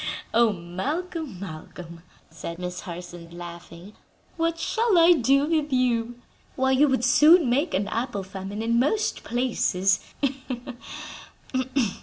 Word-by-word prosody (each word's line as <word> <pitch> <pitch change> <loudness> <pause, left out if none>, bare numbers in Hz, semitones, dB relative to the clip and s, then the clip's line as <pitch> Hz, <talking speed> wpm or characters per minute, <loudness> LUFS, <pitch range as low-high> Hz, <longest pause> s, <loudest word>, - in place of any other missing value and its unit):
"Oh, 230 -1 +5
Malcolm, 260 - -4
Malcolm!" 170 -1 -9 0.3
said 170 +1 -7
Miss 180 0 -5
Harson, 175 -1 -8
laughing; 175 +2 -10 0.4
"what 330 0 0
shall 440 +4 +1
I 335 +1 +7
do 275 -1 +3
with 305 -2 0
you? 240 -2 +1 0.4
Why, 265 0 +2
you 275 +3 +5
would 260 -3 +1
soon 310 +4 +6
make 285 +7 +1
an 200 +2 0
apple 230 -4 -2
famine 195 +3 -6
in 235 +1 +2
most 360 - 0
places. 225 -6 +1
235 Hz, 120 wpm, -25 LUFS, 180-295 Hz, 0.4 s, I